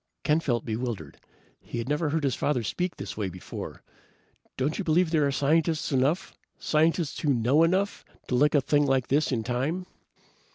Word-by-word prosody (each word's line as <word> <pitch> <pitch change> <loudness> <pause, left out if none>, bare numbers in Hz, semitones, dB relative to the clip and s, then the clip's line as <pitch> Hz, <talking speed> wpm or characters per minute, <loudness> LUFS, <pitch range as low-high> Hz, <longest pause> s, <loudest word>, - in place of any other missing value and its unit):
Ken 150 +1 +3
felt 120 -7 -1
bewildered. 110 - -4 0.4
He - - -7
had 115 +1 -3
never 150 +2 0
heard 155 +1 -1
his 135 -3 +1
father 130 -2 0
speak 180 - -2
this 100 -1 -6
way 105 -3 -2
before. 90 0 -8 0.7
"Don't 145 +7 -1
you - - -1
believe 170 0 +2
there 150 -4 +3
are - - 0
scientists 155 +4 +1
enough 140 +8 +1 0.2
scientists 160 0 +1
who 150 - +1
know 125 +7 +3
enough 190 +5 +1 0.2
to - - -3
lick 145 +5 +3
a 145 - +5
thing 145 +2 +2
like 135 -2 +1
this 145 +2 +2
in 115 -4 0
time?" 135 +10 -2
145 Hz, 180 wpm, -27 LUFS, 125-160 Hz, 0.7 s, a